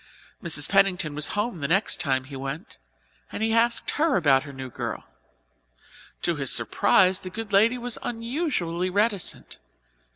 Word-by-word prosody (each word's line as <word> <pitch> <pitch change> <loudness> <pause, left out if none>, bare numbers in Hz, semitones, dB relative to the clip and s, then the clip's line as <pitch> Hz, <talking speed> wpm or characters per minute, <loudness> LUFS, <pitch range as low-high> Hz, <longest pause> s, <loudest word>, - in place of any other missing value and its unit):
Mrs. 155 -4 +3
Pennington 195 -6 +2
was 150 0 -1
home 210 -3 -2
the 140 - -2
next 190 +7 +2
time 130 -4 0
he 135 +1 -10
went, 135 +3 -7 0.5
and - - -4
he 225 0 +1
asked 230 +1 +2
her 305 -2 +2
about 140 -6 +4
her 140 - -9
new 130 -2 -8
girl. - - -5 1.2
To 170 -2 0
his 135 -2 +1
surprise 185 -1 +3
the 185 - -7
good 215 +2 -7
lady 225 +5 +4
was 245 -1 -3
unusually 230 - -2
reticent. 200 -1 -2
185 Hz, 155 wpm, -25 LUFS, 150-225 Hz, 1.2 s, about